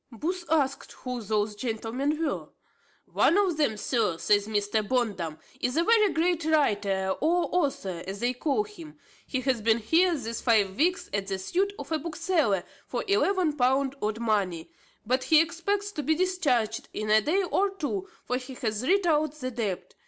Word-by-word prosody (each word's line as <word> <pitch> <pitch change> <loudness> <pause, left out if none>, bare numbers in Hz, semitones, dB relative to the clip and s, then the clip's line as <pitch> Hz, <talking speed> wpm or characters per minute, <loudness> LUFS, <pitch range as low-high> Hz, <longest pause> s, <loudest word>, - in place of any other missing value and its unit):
Booth 345 - -3
asked 280 -4 0
who 250 -2 -5
those 210 0 -1
gentlemen 240 +7 -2
were. 290 - -3 0.6
"One 350 - +3
of 380 -6 +2
them, 280 -9 +1
sir," 210 -6 0
says 205 +3 +2
Mr. 210 0 0
Bondum, 205 -9 -1 0.2
"is 250 +2 -1
a 335 - +4
very 430 -1 +4
great 340 0 +1
writer 205 -11 +1
or 345 +3 +2
author, 270 - -1
as 195 +1 -5
they 245 +2 0
call 290 +9 0
him; 345 -8 -12 0.3
he 260 - -2
hath 255 -4 0
been 225 0 +4
here 330 +10 +3
these 230 -3 -5
five 205 -5 +2
weeks 355 - +1
at 200 -1 -1
the 195 -1 -2
suit 365 - 0
of - - -8
a 315 - +1
bookseller 310 - 0 0.2
for - - -3
eleven 380 -5 +2
pound 265 0 +2
odd 215 +1 -1
money; 200 -8 -1 0.3
but 255 +3 0
he 315 - +6
expects 395 +5 -1
to 310 - -4
be 315 +3 +1
discharged 290 - 0
in 215 0 -2
a 215 0 +6
day 360 - +1
or 390 +2 +1
two, 385 +1 -4 0.2
for 250 - 0
he 255 0 -8
hath 220 -4 -2
writ 380 +9 +2
out 310 -3 +2
the 255 -4 -5
debt. 215 -6 -4
265 Hz, 180 wpm, -27 LUFS, 215-335 Hz, 0.6 s, he